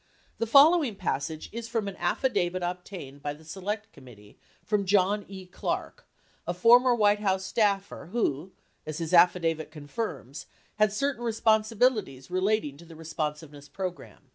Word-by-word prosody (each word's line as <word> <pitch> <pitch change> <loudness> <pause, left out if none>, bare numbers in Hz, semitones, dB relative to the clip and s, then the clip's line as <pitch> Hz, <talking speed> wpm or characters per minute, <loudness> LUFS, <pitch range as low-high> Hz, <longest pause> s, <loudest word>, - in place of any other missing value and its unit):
The 230 - 0
follow 305 +8 +7
ing 235 -7 -3
passage 160 -4 -3
is 230 +1 -6
from 225 -3 -2
an 195 - -5
affidavit 185 -1 0
98 175 0 0
obtained 180 -6 -10
by 145 0 -4
the 160 +2 -18
Select 205 +6 -5
Committee 115 -7 -16 0.3
from 210 -2 +1
John 200 +1 +2
E. 190 -1 -9
Clarke, 180 - -5 0.4
a 175 - -2
former 240 +6 +6
White 210 -2 +3
House 190 -2 0
staffer 200 -2 0
who, 180 - -2 0.3
as 155 -1 -6
his 165 0 -4
affidavit 170 -2 +4
confirms, 145 - -6 0.3
had 215 -1 +3
certain 265 +3 -2
responsibilities 220 - +1
relating 185 -5 0
to 170 - -14
the 165 -1 -13
Responsiveness 150 -2 -5
Program. 185 +2 -7
185 Hz, 150 wpm, -27 LUFS, 155-215 Hz, 0.4 s, follow